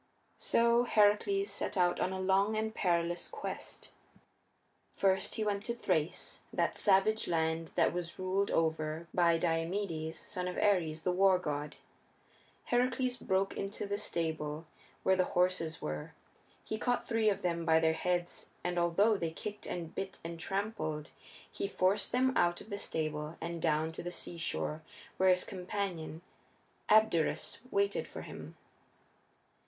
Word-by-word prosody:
So 235 +1 +4
Heracles 230 - +3
set - - -3
out 175 -1 +3
on 185 - +1
a 190 - -3
long 195 +3 +2
and 220 0 -1
perilous 175 -3 0
quest. - - -7 1.0
First 190 -1 +2
he 220 - -1
went 205 -1 -1
to 235 - -2
Thrace, 160 -9 -1
that - - 0
savage 205 +2 +3
land 160 -1 0
that - - +3
was 170 -1 -4
ruled 190 +2 0
over 160 0 0
by 170 -2 +4
Diomedes, 165 -1 -1
son 180 -3 -4
of 180 - -4
Ares, 165 -6 +2
the 180 - +2
war 190 +1 +5
god. 150 -4 -3 0.9
Heracles 250 +1 +1
broke 190 -3 0
into 200 +1 -4
the 200 0 -2
stable 160 -4 -2 0.4
where 190 - +4
the 185 - +3
horses 180 -3 +1
were; 75 0 -4 0.5
he 220 - -4
caught 245 +1 0
three 225 -2 +3
of 200 -1 -1
them 170 -1 0
by 160 -1 +5
their 160 0 +3
heads, 175 +1 -1
and 180 0 0
although 195 +6 +3
they 165 -3 -1
kicked 205 +6 -7
and 170 -2 -4
bit 195 0 -4
and 165 0 -6
trampled 165 -5 -3 0.4
he - - -2
forced 195 +1 +1
them 260 +1 +2
out 175 0 +3
of 215 - -12
the 200 - -2
stable 155 -2 -3
and 170 0 -4
down 155 0 +1
to 160 - -7
the 175 - -5
seashore, 165 -3 -3 0.4
where 190 0 +4
his 180 0 +4
companion, 180 -4 -4 0.7
Abderus, 215 -7 +3
waited 200 -2 +1
for - - -8
him. - - -9
180 Hz, 150 wpm, -33 LUFS, 165-200 Hz, 1.0 s, war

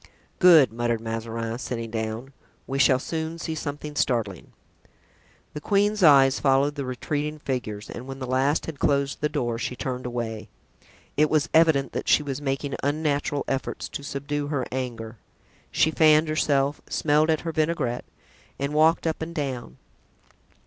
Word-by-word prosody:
"Good," 160 - +7
muttered 120 0 -1
Mazarin, 115 +1 -4
sitting 115 -3 -4
down, 110 +4 -4 0.3
"we 135 +1 -3
shall 130 0 +5
soon 160 +4 -4
see 165 -1 -4
something 150 -1 -5
startling." 110 - -1 1.0
The 150 - -6
queen's 205 +4 +1
eyes 135 -5 +6
followed 135 +1 +3
the 140 -2 -4
retreating 145 +4 -3
figures 120 -8 -4
and 125 +2 -8
when 135 0 -6
the 130 - -5
last 130 +4 +1
had 155 -4 -7
closed 140 0 +1
the 150 - +1
door 120 -5 -2
she 125 - -3
turned 125 -1 -4
away. 115 -3 -4 0.7
It 150 +1 +4
was 155 +1 +1
evident 160 -4 +4
that - - -3
she - - +5
was 140 -1 -4
making 135 0 -2
unnatural 145 -1 -1
efforts 135 -1 -3
to - - -6
subdue 145 +1 -3
her 140 -4 -1
anger; 120 -3 -5 0.5
she 160 - +2
fanned 155 0 +4
herself, 145 -2 +1
smelled 155 +1 +2
at 160 -1 +2
her 165 - -3
vinaigrette 155 -6 -1 0.5
and 140 +1 -3
walked 160 +3 +3
up 160 -1 -1
and 165 +1 -5
down. 130 - -4
140 Hz, 155 wpm, -25 LUFS, 125-155 Hz, 1.0 s, Good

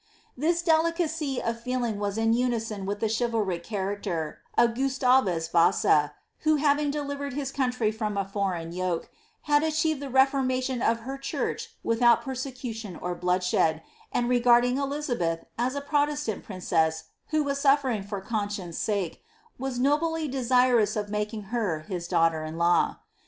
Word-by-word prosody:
This 335 +5 +1
delicacy 320 -3 +1
of 230 0 -2
feeling 240 -3 -2
vas 205 0 -2
in 225 0 +2
unison 225 -5 -1
with 205 +1 -3
the 220 - +2
chivalric 220 -6 -1
character 195 -5 -3 0.2
of 235 -1 +4
Gustavus 255 -9 +2
Vasa, 155 -3 +3 0.3
who 310 0 +3
hav 290 0 +3
ing 295 -1 0
delivered 285 -1 -3
his 275 -1 -3
country 250 -5 0
from 215 -2 -3
a 200 - 0
foreign 190 -4 -2
yoke, 180 -1 -2 0.3
had 295 0 +3
achieved 315 -1 +1
the 280 - -5
refor 270 +1 +3
mation 255 -1 -1
of 230 0 +1
her 270 +3 -6
church 275 - -3
without 235 0 +4
persecution 250 -6 -5
or 180 0 -4
blooilshed, 180 -2 +1 0.3
and 240 - 0
regarding 245 0 +4
Dizaheth 265 - -1 0.2
as 255 +3 0
a 285 - -2
protestant 290 -4 0
princess 165 -4 0 0.2
who 310 -1 +1
was 280 -1 -1
suffering 275 -6 +3
for 200 0 -5
conscience' 205 -5 -3
tike, 200 -6 -2 0.4
was 265 -1 -3
nobly 305 +4 +1
desirous 250 -4 +3
of 205 -1 -2
making 210 +1 -2
her 185 -10 0
his 175 0 -5
daughter 165 -2 +2
in 155 +1 -6
law. 170 +1 +2
235 Hz, 150 wpm, -27 LUFS, 195-275 Hz, 0.4 s, of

